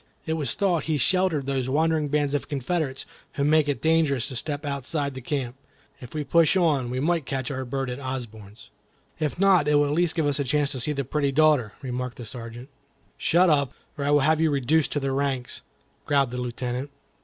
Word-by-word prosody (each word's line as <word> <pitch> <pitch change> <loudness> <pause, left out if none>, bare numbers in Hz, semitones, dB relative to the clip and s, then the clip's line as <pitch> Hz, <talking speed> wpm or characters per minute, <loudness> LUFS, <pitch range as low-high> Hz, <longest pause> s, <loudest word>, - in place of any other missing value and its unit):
It 160 - -1
was 155 -3 -1
thought 180 -6 +1
he 155 -2 0
sheltered 170 0 +2
these 130 -2 -1
wandering 155 +1 +1
bands 145 0 0
of 145 - -2
Confederates 140 0 -2 0.3
who 140 - -1
make 150 0 +3
it 135 -5 -2
dangerous 160 -6 +2
to 130 - -7
step 145 +4 -3
outside 140 +1 -2
the 130 - -7
camp. 130 -2 -3 0.4
If 125 +3 -11
we 150 - -1
push 165 +5 +3
on, 150 -9 +2
we 125 +1 -2
may 165 +4 +1
catch 135 -1 -3
our 130 -1 -3
bird 135 +2 -3
at 125 +1 -5
Osborne's." 115 -6 -7 0.5
"If 155 0 -1
not, 185 -5 +4
it 150 - +3
will 145 0 +4
at 145 - -1
least 165 +1 +1
give 160 -3 +1
you - - +3
a 140 0 0
chance 145 +1 +1
to 130 - -2
see 135 +5 0
the 140 -2 -3
pretty 140 +1 0
daughter," 145 -6 +3
remarked 125 -1 -4
the 120 - -7
Sergeant. 120 +2 -8 0.5
"Shut 180 +3 +3
up, 140 -5 +2 0.2
or 145 - -4
I 140 - 0
will 145 0 +4
have 155 +3 +3
you 160 - +3
reduced 145 +2 +1
to 145 - 0
the 135 -1 -2
ranks," 135 -2 -2 0.5
growled 140 -4 +2
the 125 - -4
Lieutenant. 125 +2 -4
140 Hz, 215 wpm, -25 LUFS, 130-155 Hz, 0.5 s, not